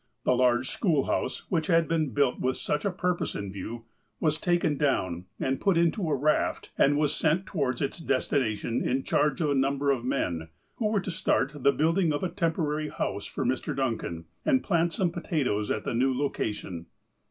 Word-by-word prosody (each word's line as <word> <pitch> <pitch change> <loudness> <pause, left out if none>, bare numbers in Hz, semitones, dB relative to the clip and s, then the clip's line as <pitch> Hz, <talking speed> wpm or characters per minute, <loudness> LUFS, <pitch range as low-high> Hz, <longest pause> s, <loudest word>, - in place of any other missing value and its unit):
The - - +3
large 125 0 +3
schoolhouse, 160 - 0
which 165 -4 +1
had 165 -3 +3
been 160 -3 +1
built 130 +1 +1
with 130 +1 0
such 150 0 -2
a - - +3
purpose 180 -1 -1
in 100 -2 -4
view, 110 +4 -6 0.4
was 155 -1 +1
taken 175 -4 +1
down 95 - 0
and 135 0 -1
put 195 -4 +3
into 170 +1 +2
a 145 - +2
raft, 150 +3 0
and 145 +1 +4
was 150 0 +2
sent 160 +5 +2
towards 140 -9 -1
its 140 - -3
destination, 130 -7 0
in 130 +1 0
charge 150 +1 +1
of 150 -3 +2
a - - +3
number 140 +1 +2
of 125 -4 -1
men, 85 -9 -1 0.3
who 220 - 0
were 210 -2 +1
to 185 - -4
start 140 -4 +1
the 140 -1 +3
build 165 +6 +1
ing 170 -5 +3
of 145 - -2
a 185 - 0
temporary 160 -4 -1
house 100 - -3
for 135 - -3
Mr. 130 +4 -1
Duncan, 115 -11 -2 0.2
and 265 -4 +2
plant 170 -3 +2
some 180 -2 0
potatoes 140 - -1
at 110 - -1
the - - -2
new 130 +3 +2
location. 105 -10 -3
145 Hz, 195 wpm, -28 LUFS, 125-165 Hz, 0.4 s, and